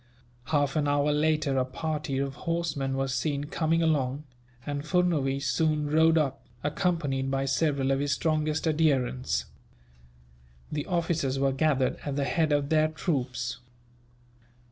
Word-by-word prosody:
Half 145 +1 +1
an 150 -2 +1
hour 145 +1 +2
later 150 -2 +1
a - - +3
party 150 +1 -3
of 135 0 -1
horsemen 145 -4 -2
were 135 0 0
seen 140 +2 -1
coming 165 +2 0
along, 145 -3 0 0.4
and 145 0 -3
Furnuwees 150 -5 +1
soon 150 0 +1
rode 160 +1 +5
up, 140 -3 0 0.2
accompanied 145 -4 0
by 135 0 0
several 135 -1 +1
of 135 - +1
his 145 0 0
strongest 155 0 0
adherents. 140 -5 +1 1.3
The 150 -1 -3
officers 165 -6 0
were 135 0 +2
gathered 135 -1 +1
at 140 -2 -3
the 140 - 0
head 160 +1 +1
of 145 -1 +1
their 155 -1 +4
troops. 135 -7 -2
145 Hz, 140 wpm, -28 LUFS, 135-155 Hz, 1.3 s, rode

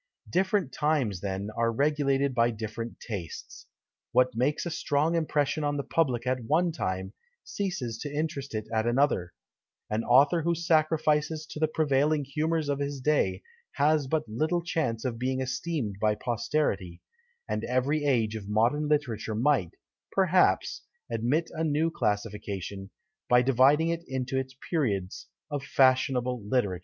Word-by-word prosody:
Different 190 -4 0
times, 140 - 0
then, 100 +1 -3
are 115 0 +1
regulated 140 +1 +1
by 120 -1 +3
different 115 +1 -6
tastes. 95 -9 -7 0.5
What 125 0 +4
makes 135 +8 0
a 175 - -3
strong 150 0 +1
impression 155 -2 0
on 145 0 0
the 140 - -2
public 130 -8 0
at 130 -1 -1
one 165 +7 +2
time, 95 - -3 0.3
ceases 145 - -3
to 145 - -5
interest 145 -4 -3
it 110 0 -3
at 110 +1 +1
another; 120 -8 +2 0.6
an 110 +2 0
author 140 +8 +5
who 170 +2 +1
sacrifices 155 -1 +1
to - - -6
the 155 - +3
prevailing 150 -1 +1
humours 155 +3 -1
of 140 -1 -1
his 140 -1 -3
day 150 +4 +1 0.3
has 150 -1 +2
but 155 -3 -1
little 155 +10 0
chance 135 -10 -1
of 115 -3 -2
being 130 +1 -1
esteemed 130 - -2
by 105 -1 +3
posterity; 115 - -1 0.5
and - - -2
every 135 +4 0
age 115 -6 +1
of 105 -2 -7
modern 120 +8 +2
literature 120 -8 -1
might, 120 - +1 0.4
perhaps, 185 -1 +2 0.3
admit 130 +9 0
of - - -7
a - - +1
new 160 +1 +1
classification, 105 - -3 0.4
by 125 0 +5
dividing 135 +5 +4
it 170 0 -2
into 130 0 -3
its 130 0 -2
periods 100 - -1 0.2
of 145 -1 -2
fashionable 130 -2 +2
literature. 105 -5 0
135 Hz, 150 wpm, -28 LUFS, 115-155 Hz, 0.6 s, author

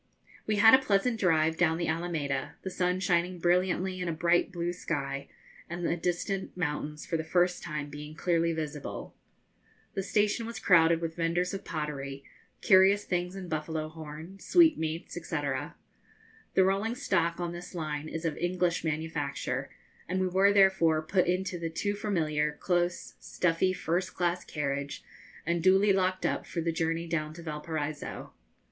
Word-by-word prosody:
We 215 - +2
had 220 +3 +7
a 260 - +9
pleasant 225 +2 +1
drive 160 -4 +3
down 165 -2 +3
the 170 - -1
Alameda, 150 -4 -2
the 190 - -4
sun 180 0 0
shining 180 0 +1
brilliantly 180 +2 +1
in 180 - -2
a - - 0
bright 170 +3 +2
blue 175 -1 -2
sky, 140 -5 -3 0.4
and 175 +1 -4
the 170 - +1
distant 180 +3 -2
mountains 150 -2 -3
for 165 - -1
the 160 - -3
first 175 +2 +1
time 150 -3 -4
being 150 +1 -8
clearly 170 -1 +1
visible. 155 -3 -5 0.8
The 195 - -1
station 210 +3 +1
was 230 - -6
crowded 165 -2 +5
with 165 -1 -3
vendors 170 +2 0
of 195 - -5
pottery, 140 -3 -4 0.4
curious 195 +1 +6
things 180 +1 -2
in 190 -2 -6
buffalo 155 -1 -3
horn, 160 +4 -9
sweetmeats, 170 - +3
&c. 170 - -5 1.2
The 190 - +6
rolling 200 +5 +1
stock 170 -7 0
on 175 -1 -2
this 175 +1 -8
line 155 -2 -3
is 165 +1 -5
of 160 -2 0
English 175 0 0
manufacture, 155 -3 -2 0.4
and 185 +1 0
we 185 - +1
were 190 +2 +4
therefore 190 -6 +4
put 180 +3 +1
into 185 0 -1
the 165 -1 -2
too 205 +5 -1
familiar, 155 -8 0
close, 175 +3 -1
stuffy, 180 +1 +1
first 180 0 -2
class 175 0 0
carriage, 140 -1 -3 0.4
and 170 +1 0
duly 190 +3 +5
locked 185 -1 +1
up - - -1
for 170 - -4
the 165 0 0
journey 165 +1 -1
down 155 -2 -2
to 170 - -9
Valparaiso. 150 -1 -5
170 Hz, 160 wpm, -29 LUFS, 155-185 Hz, 1.2 s, a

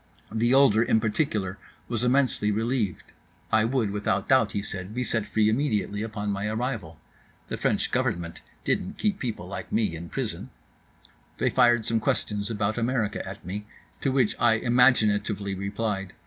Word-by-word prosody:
The 115 +2 +1
older 135 -5 +6
in 110 -1 +3
particular 105 -4 -1 0.3
was 120 -1 -2
immensely 125 -4 +2
relieved.—I 110 -1 -2
would 115 -4 0
without 100 -1 -1
doubt, 130 -5 +4
he 100 - -2
said, 95 +1 -6
be 125 - 0
set 115 -3 -1
free 110 -1 +2
immediately 110 -4 0
upon 105 -2 -3
my 100 +1 -2
arrival. 110 - -3 0.5
The - - -3
French - - 0
government 85 -1 -1 0.2
didn't 90 - -1
keep 205 -2 0
people 115 -8 -4
like 100 - -7
me 105 -6 +1
in 85 +1 -8
prison.—They - - -6
fired 120 -3 +4
some 115 0 +1
questions 105 -1 -1
about 110 0 -1
America 115 -3 0
at 95 -2 -10
me, 105 +4 -5 0.3
to 135 - 0
which 130 -5 +2
I 120 -1 +5
imaginatively 110 -4 +3
replied. 100 0 -3
110 Hz, 150 wpm, -26 LUFS, 100-120 Hz, 0.5 s, older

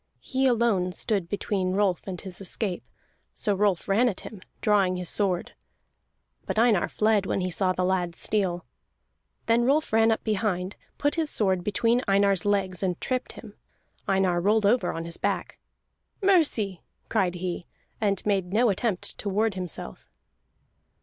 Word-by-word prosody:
He 265 +1 0
alone 220 -7 +2
stood 195 -4 -1
between 190 -2 -1
Rolf 195 -2 0
and 185 -2 -5
his 190 -1 -8
escape. 195 -1 -3 0.5
So 210 - 0
Rolf 195 -2 +1
ran 225 +5 +3
at 195 - -6
him, 205 -4 -10 0.2
drawing 195 -4 +2
his 180 -2 -3
sword. 190 -4 0 0.9
But - - -2
Einar 225 -5 +3
fled 215 -2 +2
when - - 0
he 180 0 -2
saw 185 +1 +2
the 185 0 -1
lad's 180 -2 0
steel. 185 -4 -1 0.8
Then 230 +1 +3
Rolf 280 +1 +1
ran 225 0 +5
up 220 - -1
behind, 200 -3 -1 0.2
put 290 0 +1
his 320 -3 0
sword 190 -7 +1
between 230 +5 +2
Einar's 195 -2 +3
legs, 195 -3 0
and 180 -3 -1
tripped 255 -1 -2
him. - - -11 0.5
Einar 190 -3 +2
rolled 210 +3 +2
over 205 -3 +3
on 165 0 -5
his 170 0 -4
back. - - -2 0.6
"Mercy!" 295 - +2 0.3
cried 190 -5 +1
he, 175 0 -4 0.3
and 200 -3 0
made 195 -3 0
no 225 +2 +3
attempt 195 -1 -1
to 205 - -3
ward 215 +2 +1
himself. 180 - -7
195 Hz, 155 wpm, -26 LUFS, 185-220 Hz, 0.9 s, ran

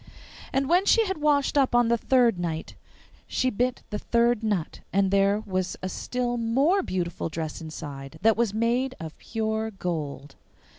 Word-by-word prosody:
And 270 0 +1
when 360 +5 +3
she 455 -1 +5
had 380 -5 -3
washed 290 -1 +2
up 260 -3 +2
on 240 -1 +5
the 235 - +3
third 240 -7 +3
night 165 -2 -3 0.5
she 255 - 0
bit 250 +3 -1
the 210 - -2
third 235 -1 +2
nut, 205 -7 -2
and 195 0 +2
there 200 +1 +3
was 185 -2 -2
a 185 - -2
still 245 +5 -2
more 270 +12 +2
beautiful 175 - -3
dress 160 0 -5
inside 145 -4 -8
that 225 0 +5
was 235 -2 +1
made 240 +4 0
of 160 -1 -7
pure 220 -1 -2
gold. 155 -8 -5
220 Hz, 165 wpm, -26 LUFS, 180-250 Hz, 0.5 s, she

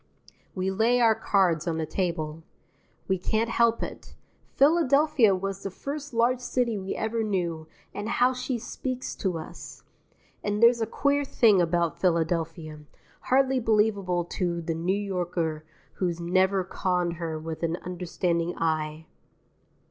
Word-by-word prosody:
We 190 0 -1
lay 225 +5 +2
our 230 -2 +5
cards 190 -7 +1
on 165 -1 0
the 160 - -1
table. 165 -2 -2 0.7
We 190 -1 +1
can't 220 +5 0
help 230 0 +2
it. - - -8 0.4
Philadelphia 285 - +4
was 195 +1 -4
the 195 - -4
first 290 +8 -6
large 240 +2 +2
city 250 -2 -1
we 190 -1 -4
ever 225 +1 -1
knew, 175 -7 -2 0.3
and 205 +2 -4
how 245 +2 +3
she 250 0 -3
speaks 255 +2 -5
to 185 -4 -1
us! 155 - -10 0.6
And 205 0 -1
there's 235 0 +6
a 225 - 0
queer 285 +5 +1
thing 220 -8 +4
about 170 -1 0
Philadelphia, 165 -2 -1 0.5
hardly 265 0 +3
believable 210 -6 +1
to 175 -1 -2
the 165 0 -3
New 175 +4 0
Yorker 175 -5 -2 0.3
who 185 - 0
has 170 -1 -3
never 185 +2 +2
conned 180 -2 -1
her 165 -2 -3
with 160 0 -6
an 165 0 0
understanding 175 -1 -2
eye. 155 -1 -1
190 Hz, 145 wpm, -27 LUFS, 170-230 Hz, 0.7 s, there's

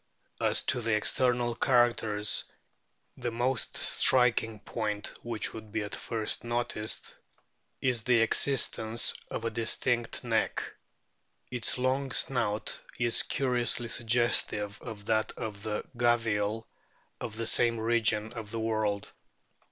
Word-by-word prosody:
As - - +1
to - - +1
external 120 +2 +1
characters, 115 -5 +2 0.7
the 120 -1 -2
most 120 +2 -1
striking 120 -4 +3
point 105 -1 -3
which 115 -3 -3
would 110 -1 -9
be 110 - -1
at 105 - -7
first 110 -2 -2
noticed 120 -2 -2 0.7
is 125 -3 +1
the 125 +1 +3
existence 115 -2 +3 0.2
of 115 - -4
a 115 - -1
distinct 115 +2 0
neck. 115 -2 0 0.9
Its 125 -1 -2
long 130 +1 0
snout 110 -5 -1 0.2
is 120 -1 +3
curiously 120 -2 +1
suggestive 115 -3 0
of 110 -4 -8
that 110 0 0
of 105 -2 -6
the 105 0 -3
Gavial 115 -2 +1 0.5
of 110 - -6
the 115 +1 -3
same 115 0 +2
region 110 -1 +1
of 115 -3 -7
the 115 +1 -4
world. 110 -2 -1
115 Hz, 120 wpm, -29 LUFS, 110-120 Hz, 0.9 s, striking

